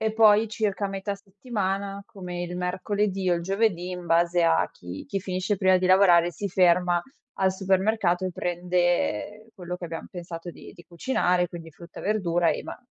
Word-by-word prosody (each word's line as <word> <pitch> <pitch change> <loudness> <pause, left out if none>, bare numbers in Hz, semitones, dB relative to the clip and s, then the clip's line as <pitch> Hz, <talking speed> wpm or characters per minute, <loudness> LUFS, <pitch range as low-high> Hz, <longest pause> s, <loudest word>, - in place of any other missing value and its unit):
e 220 0 0
poi 220 0 +5
circa 210 -2 -1
metà 195 +1 -3
settimana, 200 -1 -4
come 180 -2 -6
il 175 0 -5
mercoledì 190 +1 -1
o - - +4
il 170 - -3
giovedì, 190 -1 0
in 180 -1 -6
base 170 +1 +3
a 165 0 +3
chi 90 +1 -9
chi 195 - -3
finisce 185 +2 -2
prima 185 -1 +4
di 185 0 0
lavorare 180 -2 +5
si 200 +3 -4
ferma 180 -1 +3 0.4
al 190 0 +3
supermercato 190 -1 +1
e 185 - -1
prende, 175 - 0 0.2
ehm, - - -24
quello 180 -2 -6
che 180 - -8
abbiam 165 -1 -6
pensato 175 -1 -7
di - - -13
di 175 -3 -16
cucinare, 180 0 0
quindi 165 -1 -9
frutta 170 +2 -12
e - - -10
verdura 175 -5 +1
e - - -3
ma - - -8
180 Hz, 185 wpm, -26 LUFS, 175-195 Hz, 0.4 s, poi